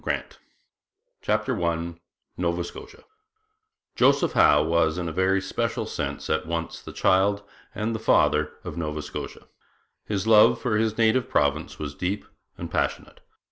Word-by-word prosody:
CHAPTER 120 -9 -1
I 85 0 -1 0.4
NOVA 85 0 -1
SCOTIA 430 - -11 0.9
Joseph 140 +2 +3
Howe 75 0 +5
was 80 0 +1
in 90 -1 -3
a - - -3
very 95 +2 +2
special 115 +4 -2
sense - - -4
at 80 0 -1
once 85 0 -4
the - - -9
child 100 +2 +2 0.3
and 110 +2 -2
the 110 - -3
father - - +2
of - - -7
Nova 75 -2 -3
Scotia. - - -7 0.6
His 100 -2 -2
love 110 -1 +6
for 110 -4 0
his 110 0 0
native 115 +2 +2
province 75 +2 0
was 70 -2 -5
deep 95 +7 -3 0.3
and - - -7
passionate. - - -2
95 Hz, 140 wpm, -25 LUFS, 85-110 Hz, 0.9 s, love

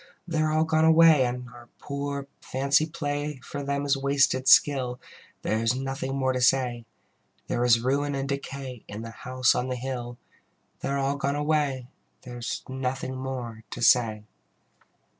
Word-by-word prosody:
They 165 -2 -1
are 155 0 +1
all 155 +1 +3
gone 160 0 +2
away, 160 -4 +6
And 125 0 -5
our 120 0 -15
poor 140 0 -4 0.2
fancy 140 +4 +1
play 145 -3 -3
For 145 - -6
them 140 0 -2
is 140 0 +3
wasted 135 -1 +1
skill: 130 -3 +5 0.4
There 110 - 0
is 115 +2 +1
nothing 135 0 -3
more 130 -1 +1
to 130 - -2
say. 125 -2 +2 0.6
There 120 - -1
is 120 -1 +5
ruin 140 +3 0
and 135 0 -2
decay 135 -3 -5
In 105 +2 -7
the 115 - -7
House 130 +2 +1
on 125 - -1
the 125 - -1
Hill: 120 -1 -5 0.6
They - - -3
are 140 - 0
all 140 +1 0
gone 140 0 -1
away, 145 -4 0 0.4
There 125 -2 -8
is 120 - -4
nothing 130 0 -3
more 125 -4 -5
to - - -7
say. 110 -3 +4
135 Hz, 170 wpm, -26 LUFS, 125-140 Hz, 0.6 s, away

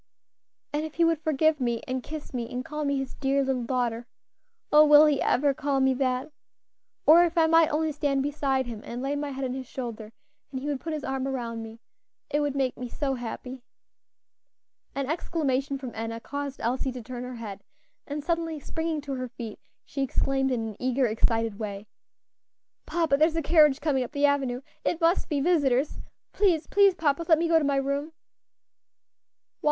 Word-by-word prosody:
And 295 +1 0
if 315 -1 -6
he 335 - +4
would 330 -2 +1
forgive 315 0 +2
me, 235 -3 -1
and 255 0 -2
kiss 305 +2 -8
me, 235 -2 -4
and 250 +1 -4
call 300 0 -4
me 280 0 +1
his 270 -1 -4
dear 275 0 +1
little 260 -3 -1
daughter. 240 -1 -1 0.6
Oh! 300 +1 +8
will 300 0 +8
he 295 -3 +2
ever 280 +2 +2
call 280 -1 0
me 265 0 +3
that? 255 +1 -1 0.7
Or 330 +3 +8
if 340 0 -1
I, 325 - +6
might 330 0 +5
only 310 +1 0
stand 280 -2 0
beside 275 -2 0
him 230 -3 -7
and 245 +2 -6
lay 280 +1 -1
my 290 0 -3
head 270 -1 -4
on 250 - -2
his 260 -1 -6
shoulder, 230 -5 -6 0.4
and 260 - -3
he 265 - -7
would 290 -2 -1
put 325 +2 -4
his 305 -2 -4
arm 265 0 -2
around 235 -4 -3
me, 225 0 -9 0.5
it 295 - +2
would 290 -2 -1
make 265 -2 0
me 250 -1 -5
so 275 +2 -2
happy." 250 +1 -6 1.3
An 275 0 -1
exclamation 280 -4 -1
from 260 -3 -7
Enna 225 +1 -4
caused 285 +2 -5
Elsie 255 +3 -1
to 250 -2 -7
turn 245 +1 -6
her 250 0 -6
head, 205 -4 -7 0.4
and 290 0 -4
suddenly 330 -1 -1
springing 320 +1 -3
to 280 -1 -5
her 255 -1 -3
feet, 230 -3 -8 0.3
she 275 - -4
exclaimed 270 0 +1
in 225 -3 -1
an 210 - -10
eager, 255 +1 +1
excited 225 -1 0
way, 205 -2 -5 1.0
"Papa, 325 -5 +2
there 310 +2 +5
is 325 - -4
a 325 - 0
carriage 300 -3 +5
coming 285 -4 +1
up 250 - -8
the 285 -1 +3
avenue 270 -3 +1 0.2
it 335 - 0
must 335 +2 +2
be 290 -3 0
visitors; 285 -4 +2 0.3
please, 360 -6 +2
please, 400 -2 +4
papa, 305 0 +1
let 320 - +7
me 335 +2 +1
go 330 -1 +5
to - - -2
my 280 -1 +1
room." 280 +1 0
"Why?" 320 - -14
275 Hz, 200 wpm, -27 LUFS, 250-305 Hz, 1.3 s, Oh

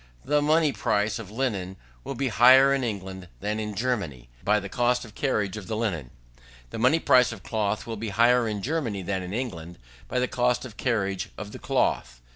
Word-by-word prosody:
The 150 +1 +2
money 155 0 +3
price 105 0 0
of 110 -4 -8
linen 105 -6 -3 0.3
will - - -5
be 135 -1 -1
higher 130 +4 +7
in 135 -1 0
England 95 -5 -5
than 105 +1 -2
in 105 -1 -4
Germany, 100 - -2
by 105 +1 +3
the 100 - -6
cost 125 +3 +1
of 110 - -14
carriage 105 -6 -1
of 105 - -8
the 110 - -2
linen. 90 - -2 0.6
The - - -5
money 125 +7 +4
price 125 -5 +4
of 105 -5 -9
cloth 110 -1 -1
will 115 -1 -5
be 110 +1 -4
higher 120 +3 +4
in 105 -2 -3
Germany 125 -10 -2
than 95 0 -2
in 90 0 -6
England, 90 -8 -5 0.3
by - - -3
the 125 0 +2
cost 125 +1 0
of 115 -4 -10
carriage 100 -7 -1
of 105 -1 -7
the - - -9
cloth. - - 0
110 Hz, 205 wpm, -26 LUFS, 100-125 Hz, 0.6 s, higher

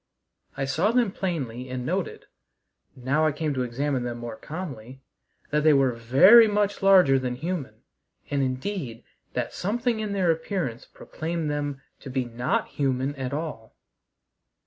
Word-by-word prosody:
I 135 - -1
saw 160 +10 +1
them 240 -4 +2
plainly 130 -11 -4
and 125 -1 -4
noted, - - -3 0.7
now 140 +5 +1
I - - +2
came 150 0 -2
to 130 - -1
examine 130 +2 -1
them 120 -1 -4
more 120 -1 -6
calmly, 135 -7 -8 0.5
that 150 0 +1
they 155 -1 +6
were 135 -2 +4
very 135 - +7
much 205 -1 0
larger 185 -9 +6
than 125 -1 -3
human, 135 -7 -5 0.5
and 140 -1 +1
indeed 130 - -3 0.3
that - - -2
something 230 +4 -1
in 210 -2 -3
their 185 -4 +2
appearance 160 - -3
proclaimed 160 -1 -4
them 145 -2 -3 0.2
to 140 - -9
be 130 -1 -1
not 120 +1 -1
human 135 0 -1
at 135 -2 -4
all. 140 -7 -5
140 Hz, 150 wpm, -26 LUFS, 125-175 Hz, 0.7 s, very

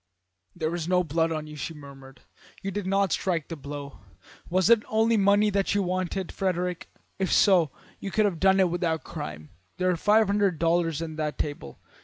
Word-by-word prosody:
"'There 160 -1 -2
is 170 -2 -3
no 180 0 +3
blood 165 +1 0
on 155 -1 -3
you,' 150 0 -10
she 160 +3 -5
murmured. 135 -2 -13 0.4
'You 195 - -2
did 200 -1 -4
not 195 -1 +2
strike 170 -5 -1
the 165 - -4
blow. 140 -1 -8 0.5
Was 185 +1 +2
it 230 0 +6
money 225 +1 +3
only 205 +2 +4
that 200 0 0
you 200 - +2
wanted, 185 0 -2
Frederick? 180 -2 -2 0.3
If 190 - 0
so, 180 -7 +5 0.3
you 195 - -5
could 215 +2 +2
have 180 -6 -1
had 190 0 +5
it 185 -3 +3
without 170 -2 -1
crime. 75 - -7 0.3
There 185 0 +2
are - - +1
five 210 +6 +4
hundred 200 -3 +1
dollars 165 -1 +1
on 160 -1 -7
that 150 -3 -2
table. 145 - -5
175 Hz, 195 wpm, -26 LUFS, 155-195 Hz, 0.5 s, it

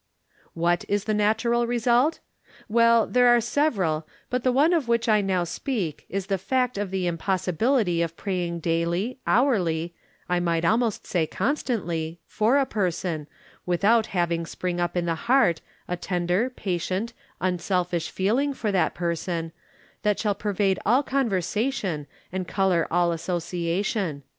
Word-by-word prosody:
What 175 +1 +1
is 205 0 0
the 215 - -1
natural 225 +3 +2
result? 245 +5 +2 0.5
Well, 230 0 +4
there 250 0 +3
are 240 0 +6
several, 200 - 0 0.2
but 250 -1 0
the 255 - +3
one 290 +7 +4
of 315 -8 +1
which 235 0 +1
I 215 -2 +4
now 190 -3 0
speak 175 - -3
is 195 +1 -2
the 195 -1 -1
fact 250 +5 0
of 205 -1 -2
the 190 -1 -2
impossibility 180 - +1
of 165 0 -2
praying 175 -4 -2
daily, 170 +9 -1
hourly 175 - +2 0.2
— - - -35
I 180 0 +1
might 170 -1 0
almost 225 +3 +1
say 165 -4 0
constantly 175 - -2
— - - -50
^for 230 +6 +2
a 275 - +2
person, 175 - -2 0.4
without 210 +6 +3
having 170 -2 -1
spring 175 +1 -3
up 175 0 -1
in 175 - 0
the 170 - +1
heart 230 -3 +2 0.3
a 180 - -1
tender, 180 +6 0
patient, 190 0 -3 0.3
unselfish 180 -2 -1
feeling 245 +9 +1
for 215 -5 -1
that 185 -4 +1
person, 170 -1 -2 0.5
that 210 -1 +1
shall 210 -2 0
pervade 200 -1 0
all 250 +7 +3
conversation, 215 - -1 0.2
and 185 -1 -3
color 190 -3 +1
all 175 0 +2
as 165 -1 -3
sociation. 175 -1 -2
190 Hz, 155 wpm, -25 LUFS, 170-235 Hz, 0.5 s, are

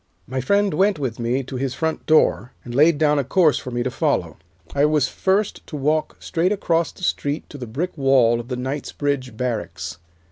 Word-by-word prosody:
"My 130 +1 -3
friend 200 +6 +2
went 195 +3 +2
with 130 -6 -3
me 120 +3 0
to 130 +1 -6
his 130 0 -2
front 160 +2 -2
door, 130 -6 +3
and 120 - -8
laid 150 +4 +5
down 150 -1 +3
a - - +1
course 155 0 +3
for - - -7
me 120 -1 -2
to 130 - -2
follow. 95 - -1 0.4
I 140 - +2
was 150 -2 +3
first 195 +2 0
to 155 - -7
walk 150 +2 0
straight 175 +2 0
across 170 -5 +1
the - - -15
street 145 -3 -1
to 145 - -9
the 125 - -6
brick 155 +11 -3
wall 135 -5 +4
of 120 - -7
the 125 -1 -3
Knightsbridge 135 -1 -3
Barracks. 90 -9 -4
140 Hz, 205 wpm, -22 LUFS, 125-160 Hz, 0.4 s, laid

